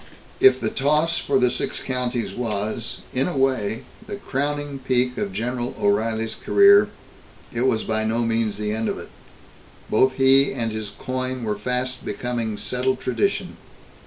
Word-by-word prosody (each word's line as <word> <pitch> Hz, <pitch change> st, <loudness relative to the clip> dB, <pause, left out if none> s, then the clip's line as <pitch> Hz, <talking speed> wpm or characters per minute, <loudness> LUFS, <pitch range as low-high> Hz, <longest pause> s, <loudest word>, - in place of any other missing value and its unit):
If 395 Hz, -, +6 dB
the -, -, -2 dB
toss 150 Hz, +4 st, +2 dB
for 140 Hz, -, +1 dB
the 125 Hz, -1 st, +3 dB
Six -, -, -2 dB
Counties 125 Hz, -2 st, -2 dB
was, 110 Hz, -1 st, -3 dB
in 130 Hz, +1 st, +1 dB
a 175 Hz, -, -3 dB
way, 130 Hz, -5 st, 0 dB, 0.2 s
the 205 Hz, -, -4 dB
crowning 145 Hz, -5 st, -3 dB
peak 125 Hz, -1 st, +1 dB
of 100 Hz, -, -2 dB
General 120 Hz, +4 st, -3 dB
O'Reilly's 110 Hz, +2 st, +1 dB
career, 405 Hz, 0 st, +5 dB, 0.6 s
it 120 Hz, +2 st, +1 dB
was 110 Hz, -4 st, +1 dB
by 110 Hz, 0 st, 0 dB
no 115 Hz, +2 st, 0 dB
means 115 Hz, -2 st, 0 dB
the 105 Hz, 0 st, -2 dB
end 110 Hz, +1 st, -1 dB
of -, -, -2 dB
it. -, -, -9 dB, 0.8 s
Both 130 Hz, +4 st, +4 dB
he 135 Hz, +1 st, +4 dB
and 115 Hz, -4 st, -2 dB
his 110 Hz, -1 st, -4 dB
coin 130 Hz, +1 st, -4 dB
were 105 Hz, -2 st, -1 dB
fast 125 Hz, +3 st, -2 dB
becoming 115 Hz, 0 st, -3 dB
settled 130 Hz, +3 st, -1 dB
tradition. 120 Hz, -3 st, -1 dB
125 Hz, 160 wpm, -23 LUFS, 110-130 Hz, 0.8 s, If